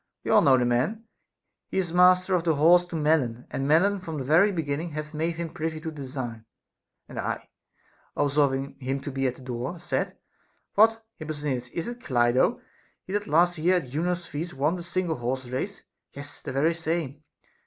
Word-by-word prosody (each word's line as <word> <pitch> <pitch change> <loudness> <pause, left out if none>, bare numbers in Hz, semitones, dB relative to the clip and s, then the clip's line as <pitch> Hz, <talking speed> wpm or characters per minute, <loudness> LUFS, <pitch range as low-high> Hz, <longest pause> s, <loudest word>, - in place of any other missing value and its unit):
You - - +1
all - - +7
know 135 -2 +6
the 125 - +2
man, 130 - 0 0.6
he - - -4
is 175 -3 0
master 180 +1 +5
of 175 -2 +2
the 165 -2 +2
horse 175 +4 +6
to 175 - -7
Melon, 150 -7 +1
and 135 - -2
Melon 190 +7 +4
from 165 -4 -6
the 135 - -3
very 165 +10 +5
beginning 160 -1 -2
hath 150 0 -5
made 165 +2 -1
him 165 -1 -4
privy 160 -3 -3
to 160 0 -5
the - - -13
design. 130 -5 -6 0.6
And - - -7
I, - - -3 0.7
observing 140 -1 +1
him 135 +1 -2
to 140 - -5
be 135 0 0
at 125 - -2
the 130 - -14
door, 125 +6 -4
said: 175 - -2 0.6
What, 225 +2 +4
Hipposthenides, 145 -5 -3
is 170 +4 -4
it 240 0 -6
Clido, 125 - +2 0.5
he 190 - -7
that 205 0 -1
last 175 +2 +3
year 180 +4 +3
at 145 -8 -4
Juno's 175 +4 -1
feast 160 +3 -5
won 150 +6 +1
the 175 - -6
single 175 -2 -1
horse 130 +2 -2
race? 130 +1 -4 0.3
Yes, 140 +1 -8
the - - -5
very 145 +5 +2
same. 160 -4 -3
155 Hz, 195 wpm, -26 LUFS, 135-175 Hz, 0.7 s, all